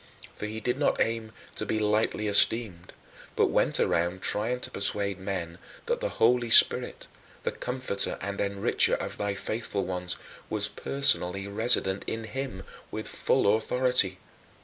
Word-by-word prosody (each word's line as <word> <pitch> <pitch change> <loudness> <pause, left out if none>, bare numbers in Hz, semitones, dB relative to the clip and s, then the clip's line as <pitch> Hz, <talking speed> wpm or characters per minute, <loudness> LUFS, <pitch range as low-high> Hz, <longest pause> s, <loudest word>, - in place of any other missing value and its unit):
For 105 - -6
he 110 +1 -5
did 125 +4 -2
not 145 - +1
aim 115 -1 -1 0.2
to - - -2
be 110 - -2
lightly 105 0 0
esteemed, 100 -3 +2 0.4
but - - +2
went - - +1
around 85 +2 0
trying 115 +4 0
to - - -5
persuade 100 -1 -2
men 95 -3 -5 0.3
that 480 0 -1
the - - -1
Holy 120 0 +2
Spirit, - - +6 0.4
the - - -1
Comforter 125 -6 -2
and 100 +1 -5
Enricher 100 0 +2
of - - -6
thy 100 -1 -2
faithful 105 0 -3
ones, 90 -1 -1 0.3
was 105 -1 +1
personally 105 -5 +1
resident 100 -2 +2
in 115 0 -3
him 115 -3 -6 0.3
with - - -5
full 100 +1 +1
authority. 125 -4 +1
105 Hz, 150 wpm, -27 LUFS, 100-120 Hz, 0.4 s, Spirit